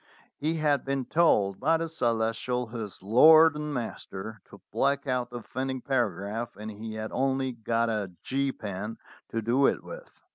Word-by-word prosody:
He 155 +3 -1
had 150 -3 +1
been 135 -1 -2
told 105 - +3
by 160 +4 +3
the 165 0 -2
Celestial, 120 -3 -1
his 110 -5 -7
lord 155 +9 +7
and 150 0 -4
master, 110 -4 -6
to - - -15
black 140 +1 +1
out 125 -2 -1
the 120 - -6
offending 130 +3 -4
paragraph, 115 -3 -2
and 105 +1 -6
he 110 +1 -7
had 110 0 -5
only 135 0 0
got 115 0 0
a 105 -4 -2
"G" 135 0 0
pen 105 0 -6 0.3
to 115 -1 -2
do 125 +5 +3
it - - 0
with. - - -11
125 Hz, 170 wpm, -28 LUFS, 110-140 Hz, 0.3 s, lord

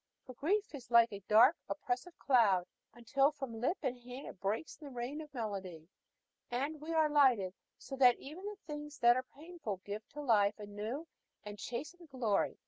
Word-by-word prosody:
For 255 - -9
grief 395 - 0
is 265 -4 -9
like 235 -2 +6
a 200 - -5
dark, 235 +9 +7
oppressive 295 +4 -3
cloud, 210 -9 +4 0.3
until 255 +4 +2
from 255 -6 -6
lip 330 +10 +1
and 255 -2 -1
hand 250 +3 -9
it - - -9
breaks 210 +10 -2
in 305 - -12
the - - -9
rain 250 +5 -4
of 300 -2 -11
melody, 190 - -5 0.6
and 280 +5 -2
we 315 +2 -5
are 320 -1 +4
lightened, 255 -11 +4 0.2
so 270 - -7
that 250 -2 +6
even 310 +7 -10
the 415 0 -6
things 295 -1 -7
that 240 0 +6
are 255 - +1 0.2
painful 310 - -6
give 210 +1 -6
to 295 - -6
life 210 -6 +3
a 210 - -7
new 215 +10 -5 0.4
and 210 -1 -8
chastened 300 - -6
glory. 235 -7 0
250 Hz, 190 wpm, -34 LUFS, 220-295 Hz, 0.6 s, dark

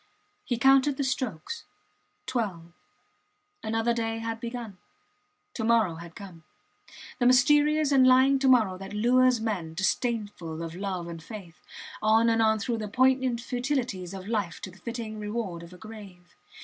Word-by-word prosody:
He 245 - -2
counted 270 +2 +4
the 280 - 0
strokes. 260 - -3 0.6
Twelve. 190 -9 -3 0.9
Another 225 +2 0
day 225 -1 -2
had 225 0 -4
begun. 230 -5 -6 0.7
To 225 - -4
morrow 220 -7 +2
had 170 0 -11
come; 185 -5 -11 0.8
the 245 - +3
mysterious 295 +4 +4
and 260 -2 +6
lying 260 +2 +5
to 270 - +1
morrow 220 -8 +4
that 195 +1 -8
lures 250 +3 +3
men, 190 -8 -3
disdainful 190 -5 -2
of 165 -1 -6
love 185 -2 -4
and 165 -1 -7
faith, 180 -3 -10 0.4
on 220 +2 +4
and 225 0 +2
on 220 0 +4
through 225 +2 -2
the 215 - -4
poignant 255 +1 +2
futilities 245 -8 -2
of 190 0 -8
life 205 -7 -2
to 185 - -7
the 190 - -18
fitting 225 +1 -6
reward 210 -5 -4
of 170 0 -12
a 180 - -12
grave. 200 -5 -12
225 Hz, 155 wpm, -27 LUFS, 185-250 Hz, 0.9 s, and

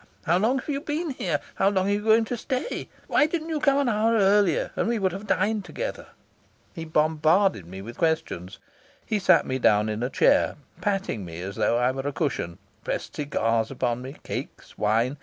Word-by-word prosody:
How 175 +1 +2
long 235 +6 +2
have 260 - -6
you 280 -2 -2
been 310 +1 -2
here? 260 - -1
How 195 - +3
long 190 -1 +1
are - - +1
you 205 +1 0
going 225 +1 +4
to 245 - -3
stay? 255 - -3 0.2
Why 300 - +3
didn't 320 0 -3
you 315 -2 -1
come 280 -1 +3
an 280 -2 +2
hour 225 0 +2
earlier, 200 -4 +3
and - - 0
we 235 0 +1
would 190 -3 +1
have 195 +4 -7
dined 210 +2 +1
together?" - - -5 0.7
He 165 -3 -6
bombarded 155 - +2
me 95 +2 -8
with 120 +3 -10
questions. 155 - -1 0.5
He 215 - 0
sat 190 - +4
me 130 0 -2
down 105 -2 +3
in 110 +1 -3
a 125 - -1
chair, - - +3 0.3
patting 195 - -1
me 85 -1 -8
as 100 +1 -6
though 120 - +2
I 125 +1 +2
were 135 +1 -4
a - - 0
cushion, 125 - -2 0.3
pressed - - -4
cigars 115 -6 0
upon 125 -2 -1
me, 130 +3 -8
cakes, - - -7
wine. 115 +6 +1
180 Hz, 205 wpm, -25 LUFS, -, 0.7 s, going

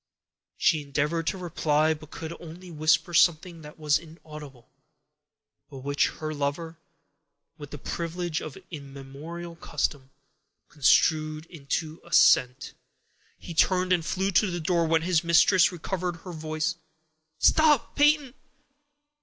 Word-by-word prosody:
She 160 -4 +2
endeavored 150 +3 -2
to 190 - -1
reply, 160 -3 +1
but 155 -1 -12
could 160 +1 -7
only 175 +2 -11
whisper 155 +2 +1
something 170 0 +2
that 150 0 -12
was 150 -2 +2
inaudible, 150 -6 -12 1.0
but 140 - -10
which 140 +1 +1
her 155 0 -6
lover, 155 +3 -4 0.8
with 145 -1 -9
the 150 - -8
privilege 170 +2 -4
of 155 - -8
immemorial 145 +4 -9
custom, 140 -4 -3 0.6
construed 155 +2 +2
into 155 +1 -4
assent. 125 +1 +3 0.6
He 170 - -9
turned 185 +2 +2
and 175 -2 +1
flew 190 +4 -1
to 200 +2 +3
the 175 -1 -3
door, 170 0 +1
when 160 0 +2
his 175 -1 +1
mistress 170 +3 +4
recovered 180 0 -4
her 185 - -8
voice:— 155 +2 -3 0.6
"Stop, 300 - +3
Peyton! 290 -3 +3
160 Hz, 125 wpm, -26 LUFS, 150-175 Hz, 1.0 s, mistress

